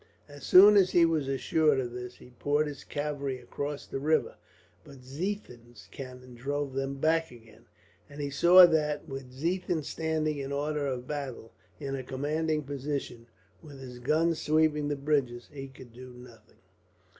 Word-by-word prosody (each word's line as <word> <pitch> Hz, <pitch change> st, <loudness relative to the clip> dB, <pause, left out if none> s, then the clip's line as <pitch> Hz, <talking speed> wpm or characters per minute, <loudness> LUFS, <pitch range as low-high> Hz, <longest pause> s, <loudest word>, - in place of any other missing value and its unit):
As 145 Hz, -1 st, -13 dB
soon 205 Hz, +3 st, +8 dB
as 190 Hz, -2 st, +5 dB
he 175 Hz, -2 st, +5 dB
was 160 Hz, -4 st, 0 dB
assured 140 Hz, +1 st, +2 dB
of 125 Hz, -2 st, -3 dB
this, 125 Hz, 0 st, -7 dB
he 125 Hz, -, -16 dB
poured 145 Hz, +1 st, +1 dB
his 145 Hz, -2 st, -7 dB
cavalry 145 Hz, -3 st, -3 dB
across 145 Hz, +2 st, -5 dB
the -, -, -5 dB
river, 155 Hz, +3 st, +1 dB, 0.5 s
but 135 Hz, -3 st, -14 dB
Ziethen's 125 Hz, -, -6 dB
cannon 125 Hz, -1 st, -10 dB
drove 140 Hz, +3 st, -3 dB
them 135 Hz, +1 st, -2 dB
back 160 Hz, +3 st, +1 dB
again; 115 Hz, -2 st, -17 dB, 0.4 s
and 145 Hz, +1 st, -11 dB
he 145 Hz, -1 st, -3 dB
saw 175 Hz, +5 st, +8 dB
that, 155 Hz, -2 st, 0 dB
with 135 Hz, -3 st, -7 dB
Ziethen 165 Hz, +3 st, -2 dB
standing 155 Hz, -1 st, -2 dB
in 135 Hz, 0 st, -5 dB
order 145 Hz, 0 st, -1 dB
of 125 Hz, -2 st, -3 dB
battle, 135 Hz, -6 st, -6 dB, 0.3 s
in 135 Hz, -2 st, -4 dB
a 135 Hz, -, -4 dB
commanding 150 Hz, +4 st, -2 dB
position, 135 Hz, -4 st, -5 dB, 0.3 s
with 145 Hz, -4 st, -12 dB
his 125 Hz, -2 st, -9 dB
guns 160 Hz, +6 st, +1 dB
sweeping 150 Hz, -1 st, +2 dB
the 145 Hz, -, -1 dB
bridges, 135 Hz, -4 st, -1 dB
he 135 Hz, -1 st, -7 dB
could 130 Hz, -3 st, -14 dB
do 130 Hz, +2 st, -11 dB
nothing. 125 Hz, -2 st, -16 dB
145 Hz, 165 wpm, -29 LUFS, 130-155 Hz, 0.5 s, soon